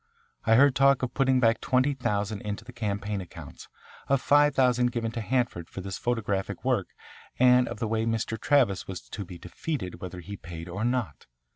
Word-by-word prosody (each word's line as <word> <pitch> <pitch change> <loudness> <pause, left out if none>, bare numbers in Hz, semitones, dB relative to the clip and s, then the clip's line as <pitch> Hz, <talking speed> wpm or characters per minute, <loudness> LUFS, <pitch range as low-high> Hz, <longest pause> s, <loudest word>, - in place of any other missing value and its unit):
I 110 - +5
heard 140 +2 +6
talk 135 0 +4
of 130 - -2
putting 130 -2 +3
back 115 -2 +3
twenty 130 +2 +2
thousand 105 -5 -2
into 105 -1 -5
the 125 - -11
campaign 105 -3 -3
accounts, 90 - -11 0.4
of 140 0 +3
five 145 +2 +4
thousand 125 -2 +3
given 115 -2 -2
to 115 0 -4
Hanford 120 -7 -1
for - - -8
his 95 -1 -5
photographic 105 -5 -2
work, - - +1 0.5
and 125 0 +5
of 120 - -5
the 115 - -2
way 110 +1 0
Mr. 115 0 -1
Travis 125 -10 +2
was 95 -2 -6
to 100 - -7
be 90 -1 -10
defeated 90 - -5
whether 90 -1 -6
he 100 +3 -8
paid 85 -1 -8
or 95 +5 -4
not. 120 - -2
115 Hz, 190 wpm, -27 LUFS, 100-125 Hz, 0.5 s, heard